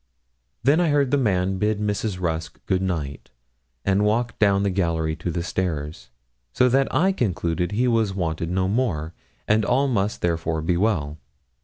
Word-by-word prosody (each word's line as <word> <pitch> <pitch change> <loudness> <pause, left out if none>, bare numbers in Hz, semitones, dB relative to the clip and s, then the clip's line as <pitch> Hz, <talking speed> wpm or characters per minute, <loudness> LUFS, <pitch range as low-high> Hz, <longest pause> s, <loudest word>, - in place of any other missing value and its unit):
Then 140 +6 +4
I 175 -2 +2
heard 145 -3 +2
the - - +4
man 95 -5 +1
bid 105 0 +1
Mrs. 105 -2 -2
Rusk 80 -2 -3
good 95 0 +1
night 80 -7 -3 0.6
and 100 +1 +2
walk 115 +3 0
down 100 -2 +3
the 100 - +1
gallery 85 -4 0
to - - -4
the 85 0 -2
stairs, 80 -7 -3 0.4
so 125 - +4
that 135 +2 +2
I 190 +4 +3
concluded 90 - -1
he 120 +4 +1
was 110 -5 +1
wanted 85 -2 -2
no 95 +1 0
more, 95 -8 -1 0.3
and 110 +1 +3
all 130 +7 +2
must 105 -5 -1
therefore 80 -2 -1
be 85 +2 +1
well. 85 -7 0
95 Hz, 170 wpm, -23 LUFS, 85-110 Hz, 0.6 s, Then